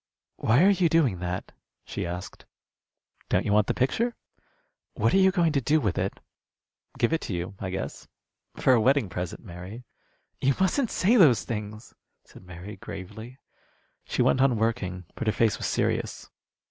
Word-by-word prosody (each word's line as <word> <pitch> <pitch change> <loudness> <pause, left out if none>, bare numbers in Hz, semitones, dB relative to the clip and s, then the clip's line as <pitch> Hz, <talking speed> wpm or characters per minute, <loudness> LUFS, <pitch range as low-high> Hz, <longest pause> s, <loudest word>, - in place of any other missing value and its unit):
"Why 120 +9 +3
are 200 - +6
you 180 -4 +2
doing 145 - +2
that?" 90 0 -4 0.3
she - - -4
asked. 90 +2 -7 0.8
"Don't - - +1
you 100 - +1
want 105 -1 +4
the - - 0
picture?" 230 - 0 0.8
"What - - +1
are 195 - +5
you 190 0 +6
going 175 -4 +2
to 140 -2 +1
do 150 +5 +3
with 105 - -1
it?" - - -2 0.8
"Give 120 - +2
it 165 - 0
to 95 - -4
you, 90 +3 -4
I 95 - -4
guess. 95 - -5 0.5
For 130 - +3
a 120 - +4
wedding 130 -3 +3
present, 90 +4 -5
Mary." 95 +6 -9 0.6
"You 135 0 +2
mustn't 215 +7 +2
say 220 +7 +3
those 145 - +6
things," 105 0 -6 0.3
said - - -16
Mary, 90 +3 -9
gravely. 110 +7 -9 0.7
She - - 0
went 130 - +3
on 130 -4 +3
working, 95 -5 -1
but 130 - -5
her 110 - +3
face 115 -3 +1
was - - -2
serious. - - -2
115 Hz, 170 wpm, -27 LUFS, 95-150 Hz, 0.8 s, are